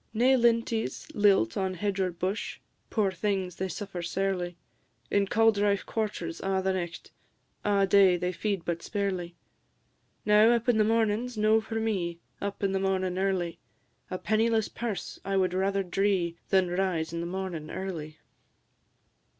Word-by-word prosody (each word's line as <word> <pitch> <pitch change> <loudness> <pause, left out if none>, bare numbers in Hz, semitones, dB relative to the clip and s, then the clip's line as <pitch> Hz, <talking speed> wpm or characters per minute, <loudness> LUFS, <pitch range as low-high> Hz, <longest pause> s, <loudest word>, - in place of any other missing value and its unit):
Nae 255 +4 +5
linties 230 -2 +1
lilt 200 - +3
on 190 -1 -1
hedge 200 +2 -2
or 185 -1 +2
bush: 185 +4 -3 0.3
Poor 205 -4 +1
things! 185 -1 -2
they 190 - -1
suffer 190 0 -5
sairly; 180 0 -2 0.5
In 200 -1 +2
cauldrife 205 -2 +3
quarters 180 -7 -3
a' 195 0 0
the 190 0 +1
nicht, 175 -2 -5 0.5
A' 200 -1 +3
day 190 -2 +5
they 180 +1 -1
feed 195 0 -2
but 170 -1 -2
sparely. 185 -4 -3 0.9
Now, 210 +1 +6
up 235 0 0
in 235 -3 +4
the - - +6
mornin's 225 +2 +1
no 215 +1 +4
for 225 +1 -7
me, 185 -6 -1 0.2
Up 200 0 -4
in 195 - +2
the 195 - 0
mornin' 190 -1 0
early; 185 -3 -1 0.5
A 185 - -3
pennyless 220 +2 +1
purse 230 -4 -5
I 195 0 -1
wad 185 -1 +2
rather 195 +1 +1
dree, 185 -2 0
Than 190 -2 +3
rise 175 -3 -1
in 170 - -2
the 170 - -3
mornin' 175 -4 -4
early. 160 -5 -5
195 Hz, 155 wpm, -28 LUFS, 180-210 Hz, 0.9 s, Now